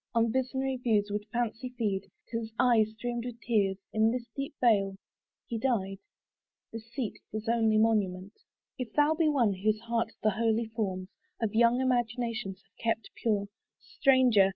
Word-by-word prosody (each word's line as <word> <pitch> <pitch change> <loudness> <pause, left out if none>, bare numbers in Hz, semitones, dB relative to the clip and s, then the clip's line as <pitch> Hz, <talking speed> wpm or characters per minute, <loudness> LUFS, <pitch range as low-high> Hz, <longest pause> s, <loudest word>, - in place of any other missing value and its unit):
On 230 -1 +3
visionary 260 +1 -1
views 215 -4 +1
would 210 +1 -3
fancy 240 +1 -2
feed, 200 -4 -1 0.2
Till 230 - -2
his 225 -1 -7
eye 240 -3 +5
streamed 235 +2 -4
with 240 -1 -6
tears. 200 -6 +1 0.2
In 220 0 +4
this 240 0 -2
deep 275 0 -4
vale 200 -5 +3 0.5
He 230 -2 -4
died, 195 -7 0 0.7
this 225 0 -8
seat 245 -4 -4
his 215 +1 -5
only 225 -2 +3
monument. 205 -3 +1 0.5
If 250 -2 -4
thou 295 +1 +4
be 320 -1 +2
one 240 -9 +3
whose 215 +3 0
heart 230 0 -1
the 215 - +4
holy 225 +2 +1
forms 195 -5 -3 0.3
Of 225 -2 -1
young 235 +2 +4
imagination 240 -4 -1
have 195 +3 -22
kept 225 -1 -1
pure, 210 -3 0 0.3
Stranger! 250 -8 +4
225 Hz, 160 wpm, -30 LUFS, 210-245 Hz, 0.7 s, eye